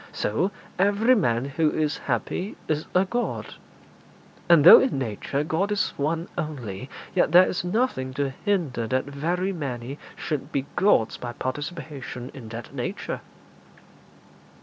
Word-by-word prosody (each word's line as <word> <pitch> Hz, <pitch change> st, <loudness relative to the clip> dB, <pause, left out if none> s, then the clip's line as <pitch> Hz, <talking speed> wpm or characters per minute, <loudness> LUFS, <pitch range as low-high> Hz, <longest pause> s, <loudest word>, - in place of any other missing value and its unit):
So 140 Hz, -, 0 dB, 0.3 s
every 205 Hz, +5 st, +4 dB
man 120 Hz, -, +2 dB
who 150 Hz, +3 st, +1 dB
is 150 Hz, -1 st, -1 dB
happy 155 Hz, -, -2 dB
is 155 Hz, 0 st, -1 dB
a 185 Hz, +1 st, +5 dB
god; 240 Hz, +5 st, -3 dB, 1.0 s
and 170 Hz, -4 st, +7 dB
though 170 Hz, -, +11 dB
in 260 Hz, -, +1 dB
nature 130 Hz, +3 st, -2 dB
God 170 Hz, +7 st, 0 dB
is 205 Hz, -, 0 dB
One 160 Hz, +4 st, -1 dB
only, 130 Hz, -7 st, -5 dB, 0.2 s
yet 175 Hz, -3 st, +2 dB
there 180 Hz, +1 st, +8 dB
is 175 Hz, -, -2 dB
nothing 180 Hz, -, 0 dB
to 140 Hz, -1 st, 0 dB
hinder 160 Hz, -, 0 dB
that 130 Hz, +2 st, 0 dB
very 170 Hz, +7 st, -1 dB
many 135 Hz, -4 st, -5 dB, 0.2 s
should 145 Hz, 0 st, -4 dB
be 140 Hz, -1 st, -1 dB
gods 175 Hz, -, +3 dB
by 120 Hz, -1 st, -6 dB
participation 140 Hz, -2 st, -5 dB
in 115 Hz, -5 st, -9 dB
that 120 Hz, +4 st, -8 dB
nature.' 155 Hz, +10 st, -4 dB
150 Hz, 140 wpm, -25 LUFS, 130-180 Hz, 1.0 s, though